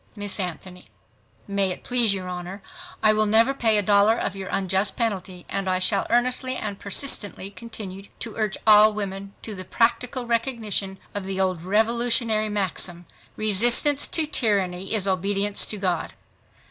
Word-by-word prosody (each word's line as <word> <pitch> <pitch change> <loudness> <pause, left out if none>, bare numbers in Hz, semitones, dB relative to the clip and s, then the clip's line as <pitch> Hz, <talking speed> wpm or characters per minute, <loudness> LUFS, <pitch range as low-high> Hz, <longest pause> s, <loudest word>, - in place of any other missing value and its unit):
Miss 205 -1 -3
ANTHONY—May 185 +2 -5
it 180 - -5
please 240 -4 +3
your 190 -2 -3
Honor, 180 +2 -7 0.4
I 215 0 +6
will 215 0 +2
never 225 +5 +4
pay 225 -5 +2
a 205 - +1
dollar 205 +3 +4
of 200 - -3
your 195 -1 -7
unjust 190 +1 0
penalty.... 190 -6 -3
And 195 -1 -3
I 185 - +1
shall 195 +2 +1
earnestly 255 +2 0
and 205 -5 -5
persistently 200 -2 -1
continue 200 -3 -9
to 225 -2 -6
urge 215 -3 -2
all 215 0 +7
women 200 -1 -6
to 220 - -6
the 185 -2 -7
practical 240 +5 -1
recognition 225 -5 -2 0.2
of 205 -2 -4
the 190 0 -4
old 185 -3 -1
Revolutionary 225 +2 +1
maxim, 185 -3 -1 0.3
"Resistance 235 +7 +4
to 320 - +1
tyranny 195 -8 0
is 200 -2 +1
obedience 200 +2 +1
to 210 - -1
God." 185 -4 -2
205 Hz, 155 wpm, -23 LUFS, 190-225 Hz, 0.4 s, all